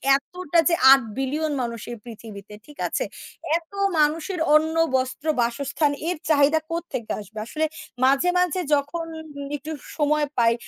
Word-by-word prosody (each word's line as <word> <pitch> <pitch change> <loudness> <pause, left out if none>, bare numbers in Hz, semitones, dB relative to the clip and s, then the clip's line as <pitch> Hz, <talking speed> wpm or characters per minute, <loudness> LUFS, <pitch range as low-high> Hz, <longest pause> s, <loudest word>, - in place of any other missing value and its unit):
এতটা 340 +3 -1
যে 335 - +3 0.2
৮ 270 0 +8 0.2
বিলিয়ন 295 +4 -1
মানুষ 235 -2 -4
এই 240 - -6
পৃথিবীতে, 215 -3 -10
ঠিক 295 - -15
আছে? - - -1 0.5
এত 335 +1 -13 0.3
মানুষের 315 +4 +1 0.2
অন্ন, 315 +1 +3 0.2
বস্ত্র, 260 +3 -2 0.2
বাসস্থানের 280 +5 0
এর 360 - -1
চাহিদা 295 +1 +4
কোত্থেকে 330 -9 -4
আসবে? 215 +1 -9
আসলে 315 +6 -1 0.4
মাঝে, 275 +7 +3
মাঝে 360 0 +1 0.2
যখন 290 +4 -2 0.5
একটু 295 +2 -7 0.3
সময় 300 0 +2
পাই, 230 -1 +4
290 Hz, 140 wpm, -24 LUFS, 255-320 Hz, 0.5 s, ৮